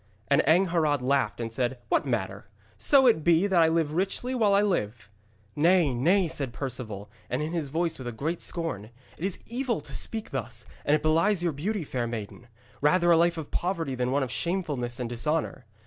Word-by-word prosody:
And 140 Hz, +2 st, +5 dB
Angharad 160 Hz, -5 st, +3 dB
laughed 130 Hz, -5 st, +1 dB
and 115 Hz, -1 st, -4 dB
said: 125 Hz, +1 st, -1 dB
'What -, -, +1 dB
matter, 100 Hz, -5 st, -3 dB, 0.3 s
so 265 Hz, -, +4 dB
it 220 Hz, -11 st, +4 dB
be 170 Hz, +3 st, +4 dB
that 190 Hz, -4 st, +3 dB
I 165 Hz, -, +5 dB
live 160 Hz, -2 st, 0 dB
richly 195 Hz, +8 st, -1 dB
while 220 Hz, -5 st, +2 dB
I 200 Hz, -, +4 dB
live!' 115 Hz, -, -2 dB, 0.4 s
'Nay, 165 Hz, -2 st, +3 dB
nay,' 175 Hz, +10 st, +3 dB
said 140 Hz, -6 st, -2 dB
Perceval, 115 Hz, -7 st, -5 dB, 0.2 s
and 125 Hz, -, -1 dB
in 155 Hz, -, -3 dB
his 165 Hz, -4 st, -1 dB
voice 165 Hz, +3 st, -1 dB
was 130 Hz, -, -6 dB
a -, -, -3 dB
great 155 Hz, +9 st, -3 dB
scorn, 165 Hz, -, -2 dB, 0.3 s
'it -, -, -7 dB
is 190 Hz, -1 st, 0 dB
evil 245 Hz, -1 st, -2 dB
to -, -, -11 dB
speak 220 Hz, -1 st, -3 dB
thus, -, -, -4 dB, 0.2 s
and 145 Hz, -, +4 dB
it 150 Hz, -, -2 dB
belies 165 Hz, +4 st, +2 dB
your 170 Hz, -3 st, 0 dB
beauty, 190 Hz, +7 st, -2 dB
fair 125 Hz, -4 st, -3 dB
maiden. 115 Hz, +1 st, -7 dB, 0.3 s
Rather 175 Hz, +4 st, +4 dB
a -, -, +7 dB
life 170 Hz, +1 st, +3 dB
of 155 Hz, -3 st, -6 dB
poverty 170 Hz, -6 st, -2 dB
than 125 Hz, -1 st, -1 dB
one 135 Hz, +1 st, +1 dB
of 125 Hz, -, -4 dB
shamefulness 145 Hz, -9 st, -2 dB
and 125 Hz, -, -2 dB
dishonour. 135 Hz, +2 st, -2 dB
155 Hz, 200 wpm, -27 LUFS, 125-175 Hz, 0.4 s, a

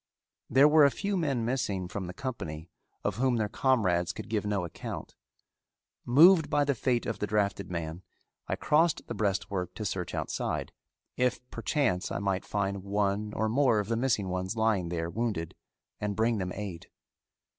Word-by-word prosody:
There 135 Hz, +4 st, +6 dB
were 155 Hz, 0 st, +6 dB
a 140 Hz, -, +7 dB
few 200 Hz, +7 st, -2 dB
men 140 Hz, -10 st, 0 dB
missing 115 Hz, -7 st, -1 dB
from 95 Hz, 0 st, -5 dB
the 90 Hz, -, -6 dB
company 85 Hz, -, -5 dB, 0.3 s
of 105 Hz, -1 st, -1 dB
whom 130 Hz, 0 st, +2 dB
their 110 Hz, -2 st, +1 dB
comrades 100 Hz, -9 st, +1 dB
could -, -, -8 dB
give 105 Hz, -2 st, -1 dB
no 100 Hz, -3 st, 0 dB
account. 85 Hz, -, -7 dB, 0.9 s
Moved 160 Hz, +6 st, +7 dB
by 145 Hz, -, +3 dB
the 140 Hz, 0 st, +1 dB
fate 120 Hz, 0 st, 0 dB
of 115 Hz, -, -3 dB
the 105 Hz, -, -1 dB
drafted 100 Hz, -1 st, 0 dB
man, 85 Hz, 0 st, -4 dB, 0.5 s
I -, -, 0 dB
crossed 155 Hz, +1 st, +2 dB
the -, -, -5 dB
breastwork 100 Hz, -3 st, -1 dB
to 105 Hz, -, -4 dB
search 95 Hz, -3 st, -3 dB
outside, -, -, -2 dB, 0.5 s
if 125 Hz, 0 st, 0 dB
perchance 115 Hz, -5 st, 0 dB
I -, -, -1 dB
might 95 Hz, -1 st, -1 dB
find 100 Hz, -1 st, -2 dB
one 100 Hz, +1 st, 0 dB
or 110 Hz, -, 0 dB
more 125 Hz, 0 st, +3 dB
of 105 Hz, 0 st, -1 dB
the 115 Hz, -, +1 dB
missing 115 Hz, -5 st, +1 dB
ones 95 Hz, +3 st, -2 dB
lying 110 Hz, -6 st, +1 dB
there 85 Hz, -1 st, -2 dB
wounded 110 Hz, -8 st, -2 dB, 0.5 s
and 105 Hz, -1 st, -2 dB
bring 115 Hz, 0 st, +1 dB
them 90 Hz, -1 st, -2 dB
aid. 100 Hz, -5 st, -6 dB
105 Hz, 175 wpm, -29 LUFS, 95-125 Hz, 0.9 s, a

